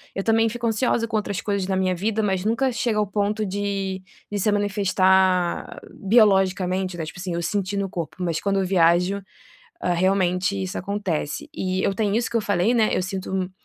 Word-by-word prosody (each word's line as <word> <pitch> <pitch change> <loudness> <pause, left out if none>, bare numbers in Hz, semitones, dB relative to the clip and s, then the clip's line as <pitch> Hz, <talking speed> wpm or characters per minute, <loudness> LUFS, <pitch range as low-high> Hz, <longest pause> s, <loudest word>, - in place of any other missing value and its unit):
Eu 195 - -2
também 225 0 +3
fico 235 +1 -4
ansiosa 230 +1 +1
com 225 - -1
outras 200 -1 -2
coisas 200 -2 -1
na 190 - 0
minha 185 -1 +1
vida 215 +4 -1
mas 190 -1 0
nunca 250 +4 +1
chega 230 -1 -1
ao 210 - +1
ponto 210 +2 -1
de 195 -1 -3 0.3
de 205 - -2
se 210 - +1
manifestar 190 -3 +2
biologicamente, 190 -3 +2
né, 160 - -3
tipo 160 - -9
assim 180 -1 -4
eu 170 - -2
senti 195 +3 -2
no 200 -1 -1
corpo 170 -1 -5
mas 165 -2 -1
quando 195 -1 0
eu 190 - 0
viajo, 180 +2 +3 0.6
eh, 180 - +1
realmente 185 +1 +1
isso 185 - -4
acontece 185 -6 -3
e 185 0 -1
eu 195 - +1
tenho 205 0 0
isso 230 0 0
que 235 - -1
eu - - +3
falei, 205 +2 +1
né, 220 -2 +3
eu - - 0
sinto 190 -1 -3
195 Hz, 200 wpm, -23 LUFS, 185-210 Hz, 0.6 s, também